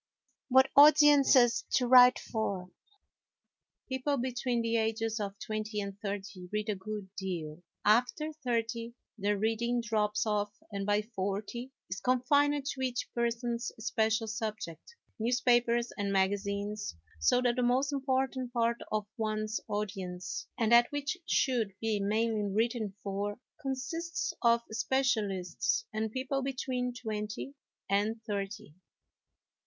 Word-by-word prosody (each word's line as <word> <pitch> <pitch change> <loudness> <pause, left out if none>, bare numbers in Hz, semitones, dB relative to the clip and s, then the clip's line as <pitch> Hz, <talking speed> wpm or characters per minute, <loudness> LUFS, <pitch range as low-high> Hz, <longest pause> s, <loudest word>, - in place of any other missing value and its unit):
What 265 +1 +5
Audience 295 -1 +8
to 240 -1 +3
Write 250 0 +8
for 195 -5 -3 1.2
People 265 +2 -1
between 245 -1 -1
the 230 0 +1
ages 225 0 -1
of 200 -1 -4
twenty 215 0 -3
and 200 -1 -4
thirty 195 -3 -5
read 210 +1 -2
a 210 - +1
good 200 0 -6
deal, 170 -4 -5 0.2
after 250 +8 +2
thirty 230 -1 -2 0.2
their 205 +1 +1
reading 225 +3 0
drops 215 -2 0
off 210 -1 -1 0.2
and 200 0 -3
by 205 +1 +2
forty 210 +4 -4 0.2
is 185 +2 -4
confined 285 +4 +2
to 275 -2 -3
each 250 -2 -2
person's 235 0 -1
special 220 0 0
subject, 220 - -5 0.2
newspapers 240 0 +2
and 200 -1 -1
magazines; 200 - -1 0.2
so 80 - +4
that 245 -1 +2
the - - +2
most 260 +4 +2
important 265 -2 -1
part 235 -1 +1
of 215 -1 0
one's 215 0 -1
audience, 190 -3 -4
and 225 -2 +1
that 240 0 +6
which 290 +3 -2
should 230 -7 +1
be 220 -2 0
mainly 210 0 0
written 220 -1 0
for, 205 +2 -3 0.2
consists 300 +6 -3
of 235 -1 +4
specialists 220 - 0
and 220 0 -2
people 265 +3 -2
between 255 -2 -2
twenty 220 +2 -5 0.3
and 210 +3 +1
thirty. 205 -3 -4
225 Hz, 125 wpm, -31 LUFS, 205-250 Hz, 1.2 s, Audience